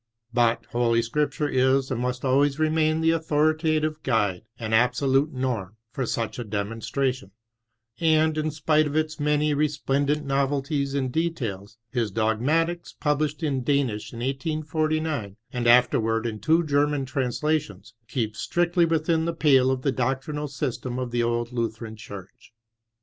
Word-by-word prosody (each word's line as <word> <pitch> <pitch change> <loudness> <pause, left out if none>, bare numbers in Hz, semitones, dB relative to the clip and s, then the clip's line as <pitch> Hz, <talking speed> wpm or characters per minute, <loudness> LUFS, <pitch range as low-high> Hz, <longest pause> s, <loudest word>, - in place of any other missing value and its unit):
But 120 -1 +2
Holy 115 -1 +2
Scripture 145 +4 -1
is 130 0 +2
and 120 -2 -1
must 125 +1 -2
always 135 +2 +3
remain 155 0 +2
the 160 0 +4
authoritative 155 -1 +1
guide 105 -9 0 0.2
and 110 -2 -4
absolute 130 +5 +3
norm 115 -6 -3
for 130 -1 -3
such 115 +2 -2
a - - -2
demonstration, 115 +3 -2 0.7
and, 160 -1 +3
in 155 0 0
spite 155 0 +2
of 145 - -5
its 155 0 -1
many 150 0 +2
resplendent 145 0 0
novelties 140 +1 0
in 135 -2 0
details, 115 - -3
his 115 -4 -1
Dogmatiea, 140 - 0
published 150 +1 0
in 140 -4 0
Danish 130 -6 0
in 115 - -7
1849, 155 - -2 0.2
and 120 -2 -1
afterward 115 -2 +4
in 110 -2 -3
two 160 +6 +3
German 145 -2 +1
trans 130 0 -2
lations, 155 -6 -1
keeps 110 -4 -3
strictly 175 0 +2
within 160 0 +1
the 170 0 -2
pale 135 -5 +4
of 130 -1 -1
the 140 - +2
doctrinal 135 +4 -2
system 130 -3 -4
of 125 -1 -3
tne 120 0 +1
old 120 0 -1
Lutheran 115 -2 -3
Church. 100 -3 -11
135 Hz, 145 wpm, -25 LUFS, 120-155 Hz, 0.7 s, the